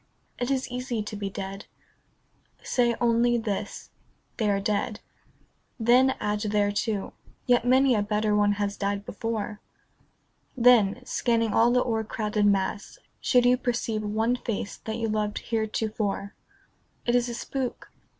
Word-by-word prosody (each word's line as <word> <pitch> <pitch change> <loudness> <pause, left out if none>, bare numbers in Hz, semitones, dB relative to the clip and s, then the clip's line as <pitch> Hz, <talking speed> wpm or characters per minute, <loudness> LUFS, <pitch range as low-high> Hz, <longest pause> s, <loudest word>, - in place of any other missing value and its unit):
It 245 - -1
is 265 -1 0
easy 245 -3 -3
to 210 - -6
be 200 -1 -3
dead. 195 0 -6 1.0
Say 240 -2 +1
only 240 0 +3
this, 215 -4 -4 0.2
" - - -42
They 215 -3 +1
are 200 -1 +2
dead." 210 +1 -1 0.8
Then 250 +3 +4
add 210 0 -1
thereto, 205 0 0 0.2
" - - -31
Yet 245 -1 +3
many 260 +1 +5
a 210 - +2
better 210 0 0
one 205 0 +3
has 205 0 -2
died 200 0 -2
before." 215 -1 -4 1.0
Then, 245 -1 +4
scanning 230 -4 0
all 230 +1 +5
the 250 +1 +3
o'ercrowded 215 -2 0
mass, 200 - 0 0.2
should 245 -2 +3
you 250 +1 +5
Perceive 235 -3 -1
one 220 +3 0
face 215 -4 -4
that 220 0 -3
you 230 -1 -1
loved 215 -1 -1
heretofore, 220 -2 -2 0.7
It 240 - +1
is 245 0 +2
a 235 - -4
spook. 260 +1 -4
220 Hz, 145 wpm, -26 LUFS, 205-240 Hz, 1.0 s, many